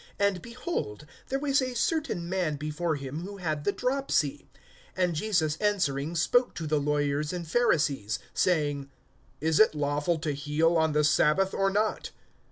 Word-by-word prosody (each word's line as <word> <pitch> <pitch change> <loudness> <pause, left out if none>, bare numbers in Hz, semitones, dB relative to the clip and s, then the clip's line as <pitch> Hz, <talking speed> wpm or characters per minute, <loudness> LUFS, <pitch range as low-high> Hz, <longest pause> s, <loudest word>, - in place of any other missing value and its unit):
(2)And, 200 -3 +1
behold, 235 - -5 0.2
there 270 - -1
was 280 0 +2
a 255 -1 -3
certain 290 - -1
man 180 -4 -1
before 155 +3 -2
him 140 +1 -5
who 200 +2 -7
had 155 -5 -3
the - - +3
dropsy. 250 - -1 0.5
(3)And 180 -2 +2
Jesus 160 -4 0
answering 170 -7 0
spoke 245 +9 +2
to 165 - -4
the 155 -1 +1
lawyers 145 +1 0
and 175 -2 -5
Pharisees, 150 - +1 0.2
saying: 145 -5 +1 0.5
Is 160 0 +2
it 215 -7 +5
lawful 145 +3 0
to 155 -1 -2
heal 150 +4 +1
on 160 -1 +2
the 150 0 +3
sabbath, 155 +5 +3
or 195 0 +2
not? 210 +2 -1
160 Hz, 160 wpm, -28 LUFS, 150-200 Hz, 0.5 s, it